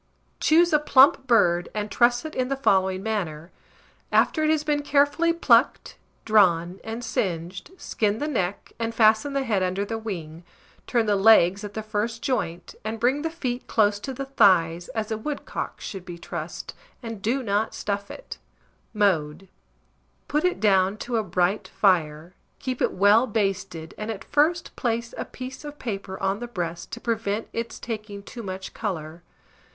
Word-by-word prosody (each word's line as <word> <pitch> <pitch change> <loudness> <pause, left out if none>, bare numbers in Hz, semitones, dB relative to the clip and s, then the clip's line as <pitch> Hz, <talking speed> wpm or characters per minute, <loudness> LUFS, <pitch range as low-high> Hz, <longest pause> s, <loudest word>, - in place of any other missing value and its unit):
Choose 335 +2 +4
a 300 - +6
plump 270 -1 +5
bird, 175 -7 +3
and 210 -1 -3
truss 240 +4 +3
it 315 - -6
in 255 -1 -1
the 275 - -1
following 190 -7 +1
manner: 175 -7 -3 0.6
After 310 - +3
it 310 - +2
has 310 -1 +2
been 295 -1 0
carefully 290 +4 +2
plucked, 335 - +2 0.3
drawn, 185 -4 +3
and 225 +2 -5
singed, 180 -2 -3
skin 210 - -1
the 295 - -2
neck, 200 -10 -2
and 230 0 -2
fasten 225 +5 +4
the 275 -1 0
head 215 -6 0
under 185 +2 -1
the 225 +2 -4
wing; 170 -7 -6 0.4
turn 235 -3 +1
the 210 -1 +2
legs 200 -2 +5
at 205 -1 -7
the 220 - -3
first 220 +2 -3
joint, 180 -10 -2
and 220 +1 -4
bring 255 +5 +2
the 325 - -1
feet 255 -7 -4
close 205 -2 +2
to 265 - -5
the 275 +1 -5
thighs, 175 -10 +3
as 220 -1 -2
a 220 - -2
woodcock 290 +5 -5
should 195 -3 -7
be 175 -1 -8
trussed, - - -6 0.3
and 225 -3 -6
do 250 +6 0
not 210 0 0
stuff 200 0 -3
it. - - -9 0.6
Mode. 185 -3 +1 0.8
Put 300 +1 0
it 360 0 +1
down 195 -1 +3
to 235 +2 -2
a 220 - +1
bright 185 +2 0
fire, 170 -3 +1 0.2
keep 255 -2 -4
it - - +2
well 205 +6 +4
basted, 195 -6 -2
and 215 +1 -4
at 220 -3 -5
first 320 +4 +1
place 235 -1 -2
a - - -4
piece 260 +2 -8
of 295 0 -8
paper 195 -6 -5
on 195 +1 0
the 240 - -5
breast 175 -6 -5
to 235 - -5
prevent 225 -2 -2
its 230 0 -4
taking 215 -3 -6
too 235 - -9
much 190 -2 -6
colour. 170 -6 -5
215 Hz, 175 wpm, -25 LUFS, 190-245 Hz, 0.8 s, a